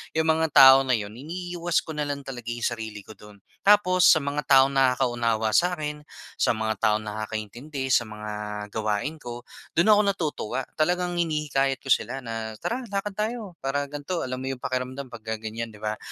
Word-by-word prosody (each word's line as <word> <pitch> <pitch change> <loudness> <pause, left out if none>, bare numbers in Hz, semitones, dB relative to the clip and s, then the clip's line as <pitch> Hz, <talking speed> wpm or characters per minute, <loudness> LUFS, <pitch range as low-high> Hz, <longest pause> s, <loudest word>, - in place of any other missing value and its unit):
'Yong 160 - +3
mga 160 0 +2
tao 130 0 +10
na 130 - +1
'yon 105 -3 -1
iniiwas 175 +3 -2
ko - - -16
na 150 - 0
lang 140 -1 -3
talaga 125 -4 -8
'yong 120 0 -4
sarili 110 -3 -3
ko 105 - -14
do'n. 105 -1 -15 0.2
Tapos, 195 -3 +5
sa 160 - +6
mga 140 0 -3
taong 135 0 +6
nakaka-unawa 120 -4 +2
sa'kin, 150 -1 0 0.3
sa - - +2
mga 110 0 -1
taong 110 -1 +2
nakakaintindi 110 +6 -5
sa 120 -2 +3
mga 105 0 -8 0.4
gawain 110 +8 -2
ko, 120 -4 -8 0.3
do'n 170 +6 +3
ako 210 -1 +7
natutuwa. 150 - -3 0.2
Talagang 175 +2 +1
hinihikayat 145 -5 0
ko 135 - -10
sila 135 +1 +1
na 115 -2 -5
"Tara, 245 +1 -2
lakad 200 +1 -2
tayo 215 -5 -3
para 140 +1 -2
gan'to, 145 +4 -4
alam 130 0 -3
mo 130 +1 -5
'yung 125 - -11
pakiramdam 130 +1 -3
pagka 110 -1 -5
ganyan." 110 0 -5
'Di 105 - -15
ba, 105 0 -2
135 Hz, 180 wpm, -25 LUFS, 110-160 Hz, 0.4 s, tao